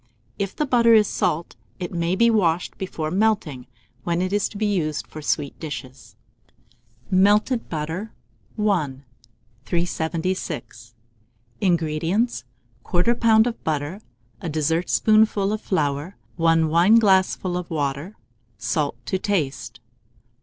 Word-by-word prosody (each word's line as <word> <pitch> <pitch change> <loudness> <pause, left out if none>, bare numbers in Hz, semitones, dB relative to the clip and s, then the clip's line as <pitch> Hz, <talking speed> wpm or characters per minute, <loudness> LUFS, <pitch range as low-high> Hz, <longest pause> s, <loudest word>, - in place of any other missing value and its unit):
If 195 -1 -3
the 300 - 0
butter 235 -4 +5
is 210 -2 +5
salt, 170 -3 -1 0.2
it 180 -1 -5
may 170 +1 0
be 235 +3 +4
washed 175 -6 +1
before 160 -5 -4
melting, 185 - 0 0.4
when 170 0 0
it 185 +2 -1
is 205 -1 +1
to 205 - -9
be 215 - 0
used 165 -8 -1
for 155 - -10
sweet 145 -1 -2
dishes. 130 -4 -8 1.0
MELTED 210 +6 +3
BUTTER. 165 +7 -4 0.5
I. 165 -11 0 0.6
376. 165 - -3 0.7
INGREDIENTS. 170 - 0 0.4
1/4 180 +7 +1
lb. 220 -1 +5
of 240 -1 -4
butter, 155 +5 -2 0.4
a 175 - -4
dessertspoonful 195 +7 +2
of 215 - -3
flour, 150 0 -1 0.2
1 165 -1 +3
wineglassful 190 0 +4
of 180 -1 -4
water, 145 +5 -3 0.4
salt 130 +7 -1
to 190 - -1
taste. 170 -10 -2
175 Hz, 115 wpm, -23 LUFS, 155-205 Hz, 1.0 s, butter